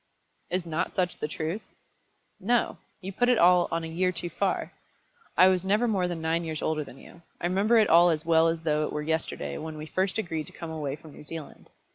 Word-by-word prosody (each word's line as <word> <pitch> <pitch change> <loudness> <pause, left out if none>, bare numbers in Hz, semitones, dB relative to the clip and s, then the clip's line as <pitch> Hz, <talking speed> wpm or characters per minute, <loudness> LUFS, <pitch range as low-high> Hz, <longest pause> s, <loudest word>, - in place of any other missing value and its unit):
"Is 180 0 -1
not 165 0 -2
such 180 -1 -1
the - - -2
truth?" 160 +6 -3 0.8
"No; 235 +5 +1 0.2
you 195 +1 -6
put 245 +5 +2
it 250 - +4
all 180 -1 +5
on 165 0 -2
a - - -4
year 180 +3 0
too 170 0 -5
far. - - -1 0.6
I 185 - +8
was 185 -1 +2
never 210 +5 +2
more 190 -5 +1
than 175 -2 -4
nine 165 +1 0
years 160 -2 -4
older 155 -1 0
than 135 - -13
you. 170 - -15 0.2
I - - -3
remember 200 +6 +3
it 220 - +5
all 170 +2 +6
as 160 -1 0
well 165 0 +4
as 165 0 -1
though 155 -1 +1
it - - -7
were 150 - -2
yesterday 150 - -2
when 155 -1 -6
we 155 - -6
first 190 +5 -1
agreed 165 -7 -3
to - - -13
come 165 -1 -7
away 150 -3 -3
from 155 0 -14
New - - -12
Zealand. 150 0 -9
170 Hz, 230 wpm, -27 LUFS, 160-185 Hz, 0.8 s, I